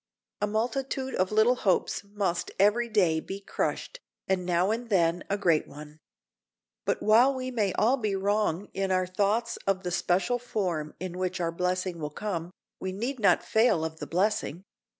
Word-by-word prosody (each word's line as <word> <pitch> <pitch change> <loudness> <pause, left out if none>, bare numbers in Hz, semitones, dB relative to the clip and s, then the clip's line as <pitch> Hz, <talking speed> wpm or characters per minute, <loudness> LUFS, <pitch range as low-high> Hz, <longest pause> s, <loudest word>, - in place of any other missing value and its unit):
A 210 - +2
multitude 260 +5 -2
of 185 +1 0
little 220 +4 +4
hopes 195 -1 +1
must 200 -4 -2
every 210 +5 +3
day 180 -7 +3
be 195 +4 -6
crushed, - - -3 0.3
and 185 -2 0
now 180 +3 +2
and 235 +1 -3
then 175 -3 +2
a 200 - +1
great 170 -6 +2
one. 150 +1 -11 0.9
But - - -1
while 240 +6 +5
we 255 0 -4
may 220 -5 +1
be 180 - -4
all 250 +4 +2 0.2
wrong 200 -2 0
in 195 0 -1
our 185 0 +2
thoughts 205 +5 0
of 195 -1 +1
the 180 - -3
special 185 +7 +1
form 180 -10 -3
in 180 0 -5
which 185 0 -2
our 170 -1 0
blessing 180 0 -1
will 150 -1 -3
come, 170 0 -4 0.3
we 190 - -3
need 240 +7 -3
not 205 - +4
fail 220 -8 +3
of 160 0 -6
the - - -6
blessing. 185 -2 0
195 Hz, 175 wpm, -28 LUFS, 175-220 Hz, 0.9 s, while